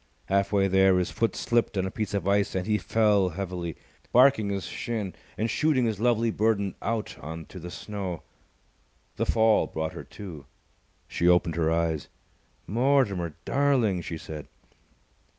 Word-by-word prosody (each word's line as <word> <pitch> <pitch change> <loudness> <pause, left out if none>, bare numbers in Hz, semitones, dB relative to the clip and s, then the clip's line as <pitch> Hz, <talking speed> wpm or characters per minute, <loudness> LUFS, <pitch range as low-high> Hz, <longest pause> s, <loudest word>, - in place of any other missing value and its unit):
Half 100 0 +2
way 100 -1 +3
there, 95 0 +4
his 90 - 0
foot 115 - 0
slipped 120 -3 0
on 95 - +1
a 95 - -3
piece 105 -1 -3
of 95 -2 -2
ice 100 0 +2
and 90 -1 -1
he 105 -1 +1
fell 105 -3 +3
heavily, 90 -1 -4 0.4
barking 125 -5 +5
his 100 -1 -2
shin 110 -6 -4 0.2
and 110 - 0
shooting 140 0 +2
his 110 -3 -1
lovely 115 -1 +2
burden 105 -3 +1
out 115 -2 -3
on 80 +2 -7
to 95 - -10
the 90 +1 -7
snow. 95 -1 -5 0.9
The - - 0
fall 110 -1 +3
brought 80 0 -3
her - - -7
to. 80 -10 -10 0.6
She 85 - 0
opened 90 -2 +4
her 80 -1 +1
eyes. 80 -3 0 0.6
"Mortimer, 110 - +1
darling!" 130 -10 +2
she 85 0 -5
said. 75 -1 -8
100 Hz, 160 wpm, -27 LUFS, 90-110 Hz, 0.9 s, barking